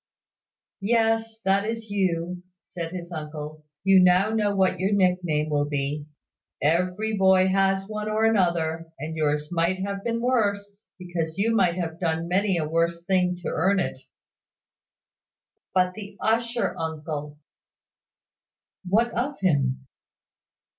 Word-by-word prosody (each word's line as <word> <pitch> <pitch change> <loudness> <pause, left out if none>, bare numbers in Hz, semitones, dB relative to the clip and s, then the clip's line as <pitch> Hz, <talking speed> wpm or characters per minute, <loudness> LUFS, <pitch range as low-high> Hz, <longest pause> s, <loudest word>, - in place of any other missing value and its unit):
"Yes; 225 +1 +1
that 195 0 +2
is 225 0 -4
you," 180 -3 -1 0.2
said 165 -2 -6
his 180 -1 -7
uncle. 155 -1 -7 0.2
"You 195 0 +6
know 185 +4 +4
now 210 -2 +1
what 190 -1 +2
your 190 +2 +1
nick 185 -3 +3
name 155 -2 -1
will 145 0 +1
be. 145 +1 -2 0.5
Every 180 +8 +1
boy 190 -1 +4
has 195 0 +2
one 215 0 -4
or 215 +1 +1
another: 170 -6 +1
and 155 +3 -5
yours 150 0 -1
might 175 +2 +1
have 200 0 -4
been 230 0 -1
worse, 205 -4 -1
because 175 -3 -4
you 225 +3 +2
might 180 -5 +3
have 165 -2 -4
done 165 -1 -1
many 190 +1 +1
a 155 -2 -1
worse 170 +1 0
thing 180 -1 +2
to - - -2
earn 195 +5 +2
it." - - -2 1.7
"But 180 -1 +2
the 205 0 -9
usher, 235 +2 0
uncle?" 150 -2 -5 1.5
"What 220 +6 +2
of 265 +5 -2
him?" 135 -7 +1
185 Hz, 135 wpm, -25 LUFS, 160-205 Hz, 1.7 s, You